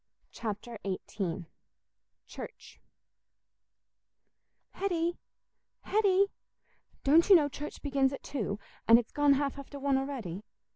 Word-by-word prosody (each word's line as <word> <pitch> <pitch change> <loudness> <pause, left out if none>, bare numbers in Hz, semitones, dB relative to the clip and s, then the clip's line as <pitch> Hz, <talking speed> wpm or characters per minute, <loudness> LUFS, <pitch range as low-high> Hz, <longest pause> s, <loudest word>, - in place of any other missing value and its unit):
Chapter 220 +1 -5
XVIII 185 -2 -3 0.8
Church - - -10 1.9
"Hetty, 345 -3 -1 0.6
Hetty, 400 -2 +3 0.7
don't 320 +7 +5
you 390 - +10
know 305 -4 +5
church 290 +2 -7
begins 275 -2 +2
at 275 - -7
two, 215 -7 -3 0.3
and 230 - +9
it's 235 -1 -2
gone 290 -1 +4
half 280 0 -1
after 280 +1 -9
one 275 -1 +2
a'ready? 240 -10 -4
275 Hz, 105 wpm, -31 LUFS, 230-305 Hz, 1.9 s, you